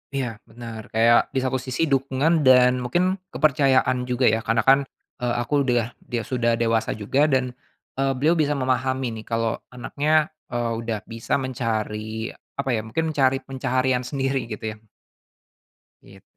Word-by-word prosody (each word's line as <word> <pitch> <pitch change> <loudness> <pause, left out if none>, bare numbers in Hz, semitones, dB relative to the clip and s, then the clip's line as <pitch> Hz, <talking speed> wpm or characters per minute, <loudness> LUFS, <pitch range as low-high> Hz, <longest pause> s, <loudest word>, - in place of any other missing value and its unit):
Iya, 115 -5 -3
benar, 115 -2 -9
kayak 115 +1 +4
di - - -5
saku 130 0 0
sisi 130 +5 -1
dukungan 140 +3 +1
dan 125 -1 +5
mungkin 180 +9 0
kepercayaan 130 -4 +2
juga 125 +1 +1
ya. 110 -1 +3
Karena 115 0 0
kan, 135 +1 +6 0.4
eee, 120 -1 0
aku 145 +4 +1
de 120 -4 +1
ah, - - -8
dia 120 -2 -4
sudah 120 -3 0
dewasa 115 -2 0
juga 135 +9 +2
dan, 130 -2 +1 0.4
eee, 135 0 0
beliau 155 +5 +3
bisa 150 -3 +1
memahami 130 -3 -1
nih - - -17
kalau 115 0 -1
anaknya, 150 +6 0 0.2
eee, 120 -1 -1
udah 115 -2 -3
bisa 115 +3 -2
mencari 110 -3 -3 0.2
apa 140 -1 -2
ya, 110 - 0
mungkin 160 +8 -2
mencari 135 -2 +3
pencaharian 130 -1 0
sendiri 135 -1 -2
gitu 110 +1 -6
ya. - - -16 1.3
It. 95 -1 -17
125 Hz, 160 wpm, -23 LUFS, 115-135 Hz, 1.3 s, kan